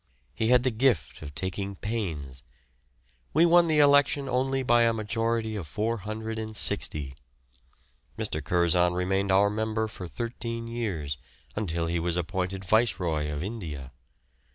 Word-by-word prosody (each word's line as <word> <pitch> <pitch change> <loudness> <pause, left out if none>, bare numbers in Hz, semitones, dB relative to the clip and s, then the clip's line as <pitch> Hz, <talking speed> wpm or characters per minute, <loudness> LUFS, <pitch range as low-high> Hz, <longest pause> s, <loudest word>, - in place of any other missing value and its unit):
He 110 - -1
had 125 +1 +5
the 130 - +2
gift 110 - +1
of 75 -2 -8
taking 95 +4 -2
pains. 80 - -4 0.9
We 165 +2 +6
won 175 0 +6
the 155 -1 +2
election 145 -1 +4
only 130 +1 0
by 120 -1 +4
a 115 -1 +4
majority 115 0 -1
of 95 -7 -5
460. 110 - -1 1.0
Mr. 75 - -2
Curzon 90 +2 +3
remained 95 +2 +1
our 100 +2 +4
member 110 +1 -1
for 95 -4 -7
thirteen 115 +2 -4
years, 90 - -3 0.4
until 85 -5 -1
he 85 +1 -1
was 85 +1 -1
appointed 95 +2 -2
Viceroy 90 -8 +1
of 75 +1 -3
India. 80 - -6
105 Hz, 130 wpm, -27 LUFS, 85-115 Hz, 1.0 s, We